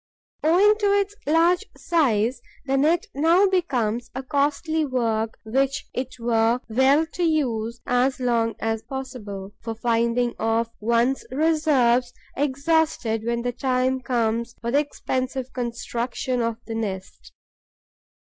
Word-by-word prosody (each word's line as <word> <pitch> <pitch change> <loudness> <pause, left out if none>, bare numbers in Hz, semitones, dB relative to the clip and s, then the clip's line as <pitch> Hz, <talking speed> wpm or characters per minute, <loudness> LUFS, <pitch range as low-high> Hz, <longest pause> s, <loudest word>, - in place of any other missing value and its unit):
Owing 395 +7 +4
to 410 - +2
its 400 +1 -2
large 335 +5 +3
size, 245 -7 +1 0.2
the 270 0 0
net 310 +5 +2
now 330 +7 +4
becomes 245 - 0
a 265 - -4
costly 295 +4 0
work 230 -5 -1
which 270 +5 0
it 255 0 -4
were 230 0 +2
well 265 +7 +3
to 335 +2 -7
use 240 -8 0
as 255 +2 +1
long 235 -2 +1
as 225 0 -1
possible, 215 -8 -7
for 225 -1 -5
fear - - -29
of - - -35
finding 235 +1 +1 0.4
one's 235 +4 +1
reserves 265 -5 +2 0.2
exhausted 280 -5 0
when 235 0 -1
the 245 0 -1
time 255 +1 0
comes 235 -1 -1
for 235 +1 -3
the 280 - +4
expensive 260 -3 -3
construction 245 +1 -3
of 230 -1 -1
the 225 - -5
nest. 195 -4 -5
255 Hz, 130 wpm, -24 LUFS, 230-290 Hz, 0.4 s, Owing